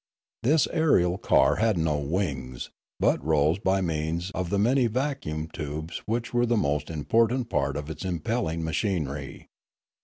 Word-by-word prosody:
This 150 +4 +3
aerial 95 - +3
car 70 +2 +3
had 110 -3 +2
no 80 -3 +1
wings, 75 -5 -3 0.3
but - - +2
rose 80 +3 +2
by 95 -1 +1
means 85 +2 -2
of 90 -3 -3
the 100 - 0
many 120 +5 +3
vacuum 115 - -2
tubes 75 +1 -5
which 115 +3 -2
were 120 0 +2
the 120 0 +2
most 75 -6 0
important 115 - +1
part 70 0 0
of 75 0 -5
its 80 - -6
impelling 85 -1 -2
machinery. 80 -5 -2
85 Hz, 150 wpm, -26 LUFS, 75-115 Hz, 0.3 s, This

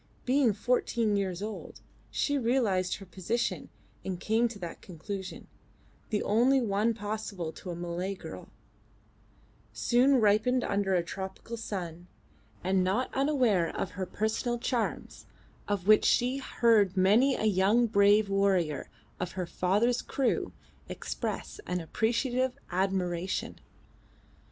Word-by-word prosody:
Being 255 -3 +3
fourteen 230 -1 +1
years 195 -1 -2
old, 215 0 -7 0.3
she 285 - 0
realised 230 -8 +1
her 195 - -10
position 190 +6 -2 0.3
and 185 -2 -4
came 225 +4 +2
to 230 -2 -8
that 175 -4 -7
conclusion, 190 +2 -7 0.6
the 210 -2 0
only 245 +6 +4
one 220 0 +1
possible 205 -5 -4
to 185 - -10
a 175 - -3
Malay 175 +3 -3
girl, - - -9 1.2
soon 255 +2 +3
ripened 220 +4 +3
under 200 -1 0
a 175 - +2
tropical 190 +5 -6
sun, 180 -6 -6 0.6
and 190 0 +2
not 200 +8 0
unaware 255 - +2
of 190 - -2
her 185 -1 -4
personal 220 +4 -1
charms, 235 -1 -3 0.4
of 205 -3 -1
which 215 +1 +6
she 250 +2 +3
heard 220 -7 +2
many 220 +9 +4
a - - -2
young 210 +4 +3
brave 205 -1 +4
warrior 190 -7 +1 0.3
of 180 -1 -3
her 185 -2 -3
father's 205 +8 +1
crew 270 -3 -1 0.4
express - - -4
an 180 - -1
appreciative 245 - 0
admiration. 185 -1 -1
205 Hz, 125 wpm, -29 LUFS, 185-235 Hz, 1.2 s, which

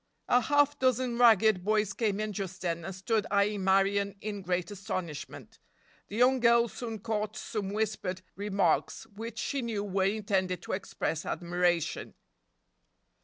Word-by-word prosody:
A 245 - +4
half 290 +1 +2
dozen 255 -2 +1
ragged 220 -5 +5
boys 210 -1 +1
came 210 -3 0
in 215 0 -2
just 190 -1 -5
then 170 -1 -1
and 190 +2 -6
stood 210 +2 0
eyeing 200 0 +1
Marion 195 +1 +2
in 205 -1 -5
great 180 0 -2
astonishment. 185 -6 -6 0.5
The 205 - -8
young 255 +3 +4
girl 235 0 +5
soon 225 -1 -5
caught 215 +1 -3
some 210 -5 -4
whispered 195 -3 -2
remarks, 200 -1 0
which 225 +1 -8
she 275 +4 -2
knew 225 -4 -2
were 195 -1 0
intended 195 -3 -1
to - - -6
express 175 -4 -2
admiration. 175 -1 -1
205 Hz, 145 wpm, -30 LUFS, 190-225 Hz, 0.5 s, ragged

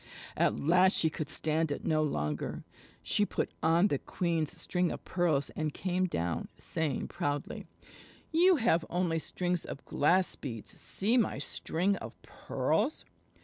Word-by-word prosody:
At - - +2
last 180 +5 +4
she 160 - +2
could 155 -1 -4
stand 160 0 0
it - - -4
no 155 -1 +2
longer. 75 - -2 0.4
She 210 - +2
put - - -1
on 170 +5 +4
the - - 0
queen's 165 -4 -2
string 180 -1 0
of - - -7
pearls 160 -6 +1
and 155 -2 -3
came 185 0 0
down, 85 - -2
saying 160 -3 -2
proudly: 145 -5 -3 0.6
"You 355 +3 +5
have 225 - +2
only 175 -2 0
strings 180 +1 -2
of 140 - -8
glass 180 +6 +2
beads. 115 -6 -6
See 220 +6 +3
my 225 - +1
string 180 +6 -1
of - - -9
pearls!" 310 - -1
165 Hz, 145 wpm, -31 LUFS, 150-185 Hz, 0.6 s, You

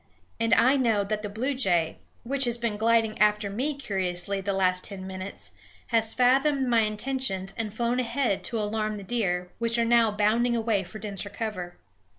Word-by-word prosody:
And 230 -1 0
I 260 +4 +4
know 225 -6 +2
that 210 +1 -3
the 210 - -5
bluejay, 205 - 0 0.3
which 275 +3 +1
has 240 -1 +4
been 235 -3 -2
gliding 225 0 +1
after 210 -1 +2
me 270 +8 -2
curiously 195 -5 -1
the 200 +1 -2
last 185 -1 +2
ten 190 -2 -7
minutes, 190 +1 -7 0.4
has 225 -1 +3
fathomed 265 +2 +3
my 235 -2 +3
intentions 215 -3 -1
and 220 -2 -3
flown 235 +3 -1
ahead 240 -3 -1
to 230 - -2
alarm 215 0 -2
the 200 - -8
deer, 180 -5 -1
which 230 0 0
are 235 - +2
now 230 -1 +4
bounding 215 +4 +1
away 220 -4 0
for 185 +4 -9
denser 200 -2 -4
cover. 200 -5 -5
220 Hz, 175 wpm, -26 LUFS, 200-235 Hz, 0.4 s, I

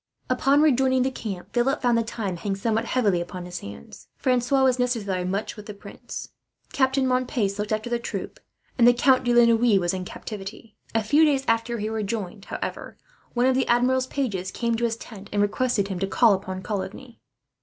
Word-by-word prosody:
Upon 275 +3 +3
rejoining 260 -3 +3
the 265 - 0
camp, 205 -8 -7
Philip 255 +4 +1
found 245 -2 +2
the 230 - +3
time 215 -5 -4
hang 195 +3 -2
somewhat 225 +3 0
heavily 205 -9 +1
upon 180 +1 -6
his 180 0 -6
hands. 100 -8 -11
Francois 255 +1 +2
was 255 -1 +3
necessarily 205 -7 -1
much 195 +4 -2
with 210 -2 -11
the 210 - -7
prince. 200 - -9 0.4
Captain 265 0 +2
Montpace 250 -6 0
looked 210 +1 -3
after 215 +2 -1
the 240 0 -1
troop, - - -6 0.4
and 235 - +7
the 245 - +6
Count 255 +1 +4
de 245 - +1
la 240 0 +6
Noue 230 -3 +4
was 175 0 0
in 185 -1 -3
captivity. 210 +3 -8 0.2
A 225 - +2
few 290 +9 +4
days 280 -3 +2
after 230 +1 +1
he 210 -1 -3
rejoined, 210 -2 -4
however, - - -5 0.4
one 240 +1 +3
of 260 - +4
the 260 -1 +1
Admiral's 255 +2 +2
pages 205 -10 -2
came 235 +4 -1
to 235 +1 0
his 230 -1 -1
tent, 205 -3 -11
and 205 - -1
requested 205 0 +1
him 190 -2 -3
to 195 - -1
call 225 +2 +4
upon 190 -1 -4
Coligny. 215 +5 -5
230 Hz, 200 wpm, -25 LUFS, 200-255 Hz, 0.4 s, and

